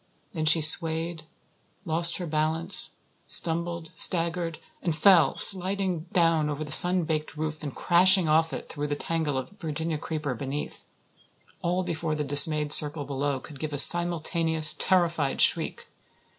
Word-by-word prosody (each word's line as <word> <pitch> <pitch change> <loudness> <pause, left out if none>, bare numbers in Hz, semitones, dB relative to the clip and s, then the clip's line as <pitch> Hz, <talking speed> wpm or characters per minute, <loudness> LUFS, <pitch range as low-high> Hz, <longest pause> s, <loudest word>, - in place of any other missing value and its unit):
Then 160 -3 -6
she 160 +1 +2
swayed, 160 +1 +3 0.6
lost 170 +1 +1
her 180 - -8
balance, 160 +4 +2 0.3
stumbled, 170 0 +1
staggered, 165 0 -1 0.2
and 170 -3 -5
fell, 180 -1 +1
sliding 185 -3 +2
down 165 -3 -1
over 150 +1 -7
the 150 - -11
sun 180 +3 +3
baked 155 0 -6
roof 155 0 -7
and 145 -4 -9
crashing 185 0 +3
off 160 +1 -1
it - - -10
through 145 0 -7
the 145 - -5
tangle 155 -2 -5
of 130 +6 -8
Virginia 160 -1 -6
creeper 150 -3 -7
beneath 135 +4 -9 0.8
all 180 +2 -4
before 160 -2 -6
the 150 - -5
dismayed 150 +1 +3
circle 150 -1 +5
below 140 0 -5
could 140 0 -15
give 155 0 -7
a - - -5
simultaneous, 165 -1 +3
terrified 170 -6 -2
shriek. - - -1
160 Hz, 145 wpm, -23 LUFS, 150-170 Hz, 0.8 s, circle